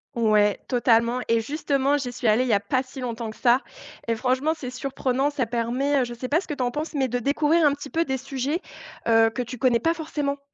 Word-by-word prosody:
Ouais, 215 -3 +3
totalement 235 0 +2
et 230 0 +3
justement 280 +2 0
j'y 250 -3 -4
suis 245 0 -7
allée 215 +3 +4
il 255 - 0
y - - +3
a 200 - +4
pas 230 +6 0
si 260 +1 -11
longtemps 235 -2 -4
que 215 - -10
ça, 245 +2 +4 0.5
et 230 - +1
franchement 260 +6 +1
c'est 255 -5 -7
surprenant, 265 +1 -1
ça 285 -4 -1
permet, 245 +5 0
heu, - - +2
je 240 -1 -5
sais 255 +2 -5
pas 315 +6 +2
ce - - -13
que 295 - -3
tu 260 - -2
en 245 - 0
penses, 300 +4 -4
mais 270 -2 +1
de 245 0 -2
découvrir 300 +6 +2
un 285 - +3
petit 285 -1 -9
peu 330 +1 +1
des 265 -2 -1
sujets, 270 +4 -3 0.5
heu, 225 -1 +5
que 250 +2 -3
tu 245 +1 -8
connais 240 -1 +3
pas 330 +8 +1
forcément. 295 -3 -3
255 Hz, 250 wpm, -24 LUFS, 235-285 Hz, 0.5 s, heu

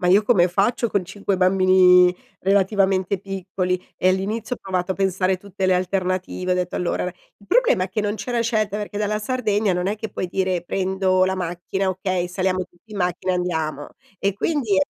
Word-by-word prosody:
ma 180 - 0
io 195 +4 +6
come 190 -6 +4
faccio 210 +5 +1
con 200 - +1
5 195 +1 -3
bambini 185 -1 +5 0.3
relativamente 195 -1 +2
piccoli!" 185 -1 -3 0.2
E 185 - +2
all'inizio 210 +5 -1
ho - - -25
provato 185 -1 -2
a - - -7
pensare 190 -1 +1
tutte 195 0 -5
le 185 - +4
alternative, 185 0 -1
ho - - +2
detto: 180 -1 -2
"Allora" 180 - -1 0.4
il 200 - -19
problema 460 - +3
è - - -6
che 205 +3 -2
non 210 +1 -1
c'era 245 +1 -3
scelta, 215 -3 0
perché 205 0 -5
dalla 210 0 0
Sardegna 215 -4 0
non 180 +1 -1
è 210 +2 -1
che 220 -1 -6
puoi 185 - -3
dire: 185 -1 -1
"Prendo 185 0 +1
la 190 0 0
macchina, 180 +2 -2
okay, 185 -1 -1
saliamo 185 0 -1
tutti 175 +4 -29
in 200 - -5
macchina 180 +1 0
e 180 - +1
andiamo." 160 -5 -2 0.3
E 200 -1 0
quindi 240 -4 0
190 Hz, 195 wpm, -22 LUFS, 180-205 Hz, 0.4 s, io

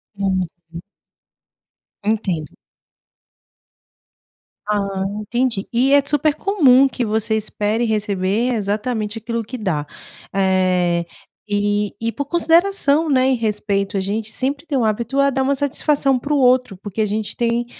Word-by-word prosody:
Uhum. 190 -2 0 1.6
Entendo. 195 -8 -1 2.1
Ah, 200 -2 -1 0.2
entendi, 235 -1 -1
e 260 +4 +2
é 285 - +7
d 280 - -8
super 295 0 +2
comum 275 -9 +4
que 245 -1 -2
você 220 +1 0
espere 215 +2 -1
receber 210 +2 0
exatamente 215 +1 -2
aquilo 230 +1 -3
que 250 +4 -7
dá, 170 -9 -2 0.5
eh, 185 -3 +2 0.4
e 205 0 0
e 230 0 -1
por 285 - -4
consideração, 330 -1 +2
né, 260 -1 +3
e - - +3
respeito, 210 -3 -1
a 195 - +1
gente 210 +3 -3
sempre 280 +4 -2
tem 285 -5 -1
o 240 - +1
hábito 235 +5 -1
a 280 - +4
dar 265 0 0
uma 280 +1 +1
satisfação 280 -1 +1
para 290 +4 -2
o - - +3
outro, 250 -4 +3
porque 205 +1 -7
a 215 - +3
gente 210 +1 -3
tem 235 0 0
225 Hz, 140 wpm, -20 LUFS, 205-265 Hz, 2.1 s, é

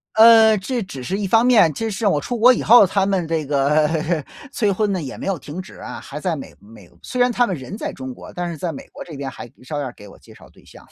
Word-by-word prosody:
呃， 220 0 +7
这 240 +5 -3
只 140 -8 -9
是 190 +9 -3
一 205 - -3
方 225 +5 +4
面， 220 -11 +5
这 225 +8 -3
是 215 +2 -4
我 150 -8 +2
出 245 - -4
国 245 +3 +6
以 - - -3
后， 235 -2 +7
他 195 +1 0
们 190 -4 0
这 160 -3 -2
个 150 +3 +1 0.3
催 210 -7 0
婚 205 +1 0
呢 185 -3 -2
也 135 - -7
没 - - -7
有 195 -4 -2
停 150 +6 -8
止 185 - -10
啊， - - -8
还 145 - -8
在 170 +1 -2
美 140 - -9
美 105 -3 -16
虽 250 - -6
然 245 0 +3
他 245 +1 +2
们 185 - -2
人 135 +6 -8
在 - - -4
中 130 -1 -8
国， - - -12
但 175 0 -4
是 - - -6
在 165 +2 -4
美 145 - -10
国 - - -10
这 165 - -11
边 135 -1 -5
还 - - -10 0.2
照 145 +2 -4
样 140 - -3
儿 120 - -9
给 105 - -13
我 - - -15
介 - - -19
绍 - - -16
对 - - -22
象。 - - -17
180 Hz, 310 characters per minute, -20 LUFS, 145-215 Hz, 0.3 s, 呃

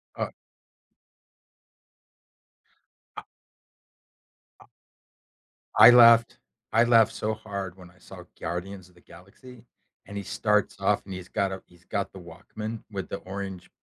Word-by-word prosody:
Uh - - -3 2.9
A - - -6 1.4
A - - -17 1.1
I - - +10
laughed 115 -1 +6 0.3
I 115 +1 +4
laughed 115 -2 +4
so 110 +1 -2
hard 100 -4 -7
when 90 -1 -14
I 90 - -26
saw - - -12 0.2
Guardians 90 +2 -6
of 90 - -26
the 85 - -21
Galaxy, 110 +8 -16 0.4
and 100 - -8
he 100 - -5
starts 105 +1 0
off, 100 +1 +1
and 95 - -8
he's 90 -1 -8
got 100 -1 -1
a 95 - -6
he's 90 0 -23
got 100 -2 -3
the 95 - -11
Walkman 105 +6 -8
with 95 -2 -6
the - - -4
orange 95 -1 -8
100 Hz, 135 wpm, -26 LUFS, 90-110 Hz, 2.9 s, I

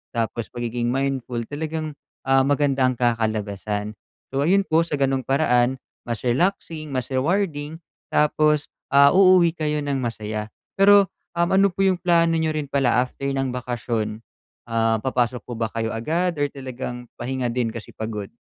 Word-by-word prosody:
Tapos, 115 0 -2
pagiging 120 0 -3
mindful 130 -3 -2
talagang, 155 +1 -3 0.4
ah, 135 0 +5
maganda 140 -1 +2
ang 130 -1 +2
kakalabasan. 110 -3 -1 0.4
So, 135 - +1
ayun 195 +5 +3
po 160 +1 +3
sa 150 -3 -3
gano'ng 135 -1 +1
paraan 130 -2 +2 0.3
mas 115 -3 -3
relaxing, 155 +2 0
mas 130 -2 -1
rewarding, 155 +1 -1 0.3
tapos, 150 0 +2 0.3
ah, 140 +1 +7
uuwi 185 -3 +6
kayo 150 -2 -1
ng 140 -1 -1
masaya. 110 -2 -4 0.3
Pero, 200 0 +6 0.3
uhm, 170 0 +3
ano 195 +1 +5
po 175 - -19
yung 185 -1 +2
plano 170 -2 +3
niyo 160 -1 +1
rin 155 -1 -2
pala 135 -3 +2
after 130 +2 -8
ng 135 -1 -1
bakasyon, 115 -3 -3 0.5
ah, 115 -1 +1
papasok 125 -2 0
po 120 - -5
ba 115 -1 -2
kayo 115 -1 -2
agad 170 +9 0
or 145 - +4
talagang 130 -2 -6
pahinga 130 0 -3
din 120 -2 0
kasi 115 - -9
pagod? 105 -2 -5
135 Hz, 155 wpm, -23 LUFS, 120-155 Hz, 0.5 s, ah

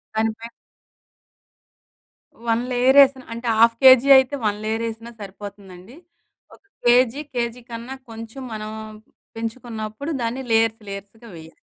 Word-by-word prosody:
దానిపై 225 +1 -2 2.0
one 230 +1 +2
layer 255 +3 +3
వేసిన, 270 -1 +3
అంటే 235 +1 -6
1/2 245 +4 +6
అయితే, 265 +2 +2
వన్ 205 -1 0
లేయర్ 225 +1 -2
వేసినా 230 +1 -8
సరిపోతుందండి. 200 +1 -11 0.6
ఒక - - -27 0.2
కేజీ 250 +3 +4
కేజీ 240 0 -2
కన్నా 235 +3 -7 0.2
కొంచెం 225 +4 -9
మనం 215 0 -6 0.7
పెంచుకున్నప్పుడు, 225 +3 -5
దాన్ని 235 +3 -3
లేయర్స్ 225 0 +2
లేయర్స్‌గా 200 +4 -10
వేయాలి. 160 0 -13
230 Hz, 115 wpm, -22 LUFS, 220-250 Hz, 2.0 s, 1/2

